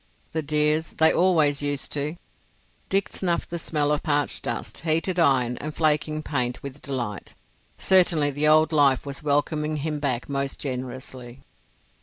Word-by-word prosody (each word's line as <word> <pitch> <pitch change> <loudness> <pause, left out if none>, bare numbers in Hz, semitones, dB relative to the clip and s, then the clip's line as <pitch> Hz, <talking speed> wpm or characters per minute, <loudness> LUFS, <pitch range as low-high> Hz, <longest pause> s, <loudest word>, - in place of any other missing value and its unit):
"The 160 - -1
dears—they 155 +2 +2
always 155 -6 +3
used 145 -1 -1
to!" 150 +2 -2 0.7
Dick 195 0 +1
snuffed 175 -3 -2
the 170 - -3
smell 150 -2 0
of 150 - 0
parched 145 -4 0
dust, - - -4
heated 165 +3 0
iron, 125 -6 +3
and 155 +1 -6
flaking 155 0 +1
paint 125 -5 -2
with 140 +1 -8
delight. 120 -8 -5 0.4
Certainly 170 -6 +4
the 145 +2 0
old 155 +1 +5
life 140 -4 +3
was 140 -1 -6
welcoming 150 +1 0
him 150 +1 -3
back 130 -4 -2
most 140 -1 -3
generously. 130 -1 -6
150 Hz, 145 wpm, -24 LUFS, 140-155 Hz, 0.7 s, old